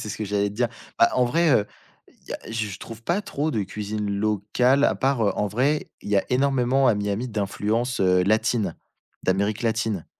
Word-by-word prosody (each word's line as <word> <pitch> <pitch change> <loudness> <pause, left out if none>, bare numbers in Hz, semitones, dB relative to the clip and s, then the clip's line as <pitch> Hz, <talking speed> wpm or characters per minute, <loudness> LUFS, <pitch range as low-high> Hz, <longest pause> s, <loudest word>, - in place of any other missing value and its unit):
c'est - - -5
ce - - -4
que 110 - -3
j'allais 100 0 0
te 100 - -9
dire. 120 +2 +1 0.3
Bah, - - +6
en 125 - +3
vrai, 165 +7 +2
heu, 105 -6 +3 0.4
il - - -26
y - - -2
a - - -4
je 105 -4 -3
trouve, 115 0 -10
pas 175 - 0
trop 155 -5 -2
de 110 -8 -1
cuisine 105 +2 -4
locale 110 +7 +2
à - - +3
part, 135 -3 +1
heu, 100 - +2
en 105 - +1
vrai, 135 +8 0
il - - -9
y 105 - +3
a 100 - +2
énormément 135 0 +2
à 115 - +4
Miami 105 +4 -2
d'influence, 110 +3 -1
heu, 90 -1 +4
latine, 105 -2 +1 0.5
d'Amérique 100 +4 0
latine. 110 -5 -1
110 Hz, 210 wpm, -24 LUFS, 100-125 Hz, 0.5 s, Bah